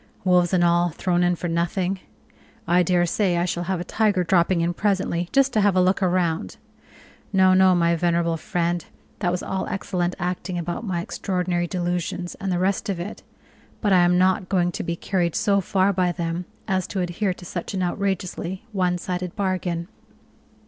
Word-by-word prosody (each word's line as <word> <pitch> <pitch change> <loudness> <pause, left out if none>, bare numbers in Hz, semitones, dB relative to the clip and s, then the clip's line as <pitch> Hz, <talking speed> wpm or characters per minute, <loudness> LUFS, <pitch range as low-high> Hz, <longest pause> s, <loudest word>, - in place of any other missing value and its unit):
Wolves 180 -2 +3
and 180 -2 +3
all 175 0 +3
thrown 175 +2 0
in 175 0 +3
for 175 - -4
nothing! 175 +3 -1 0.7
I 175 +1 +4
daresay 175 +1 +2
I 170 - +1
shall 175 -1 -2
have 185 0 -1
a - - -3
tiger 205 -1 +1
dropping 170 0 +2
in 170 +1 0
presently 185 -3 0
just 275 -1 +3
to 215 - +3
have 200 -2 +3
a - - +4
look 185 +2 +2
round. 175 - 0 0.7
No, 190 -1 +5
no, 185 0 +5
my 170 -1 +3
venerable 170 0 +1
friend, 170 +1 -1 0.4
that 180 - +1
was 180 - -2
all 190 0 -3
excellent 180 -2 -2
acting 180 0 -3
about 175 +4 -3
my 185 -6 -2
extraordinary 180 -1 -2
delusions, 175 0 -2
and 195 -1 -1
the 180 - +1
rest 190 +4 0
of 190 -3 -2
it, 185 +5 -6 0.6
but 205 -3 +2
I 185 - +6
am 175 0 +4
not 185 0 +2
going 175 -2 +2
to - - -4
be 170 0 -2
carried 175 -2 -1
so 200 -1 +2
far 190 +2 +2
by 180 -1 +1
them 170 +1 -3 0.2
as 190 -3 0
to 190 - -2
adhere 180 +2 -1
to 180 - -12
such 175 +3 -5
an 185 - 0
outrageously 190 +1 -2
one 180 -3 +1
sided 180 0 -4
bargain." 185 -4 -2
180 Hz, 185 wpm, -23 LUFS, 175-190 Hz, 0.7 s, I